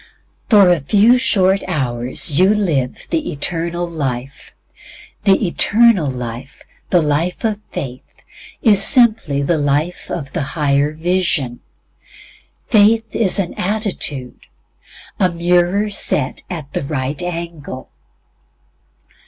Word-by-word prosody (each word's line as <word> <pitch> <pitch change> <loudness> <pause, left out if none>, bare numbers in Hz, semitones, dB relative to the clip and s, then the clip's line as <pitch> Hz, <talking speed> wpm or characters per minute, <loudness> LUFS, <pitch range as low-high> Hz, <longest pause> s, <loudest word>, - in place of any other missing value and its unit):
For 200 -5 +6
a 175 - +2
few 210 - +3
short 195 -5 +2
hours 130 -1 0
you 190 +3 +4
live 150 -12 -2
the 320 -2 -1
Eternal 170 +4 -3
Life. 135 -5 -5 0.7
The 195 +1 +3
eternal 205 -2 +3
life, 125 +1 -7 0.3
the 175 -3 +3
life 155 +7 -1
of 215 -1 -1
faith, 130 -2 -8 0.4
is 205 -4 +6
simply 220 - +3
the 160 +2 0
life 145 +5 -1
of 145 -6 -6
a - - -1
higher 145 0 0
vision. 160 -6 -1 1.1
Faith 220 +1 +3
is 205 -3 +2
an 190 -3 -2
attitude 180 - -3 0.7
a 185 - +3
mirror 175 +4 +1
set 140 -8 -1
at 155 -6 -7
the - - -2
right 140 +1 -3
angle. 170 -6 -6
170 Hz, 110 wpm, -17 LUFS, 140-200 Hz, 1.1 s, For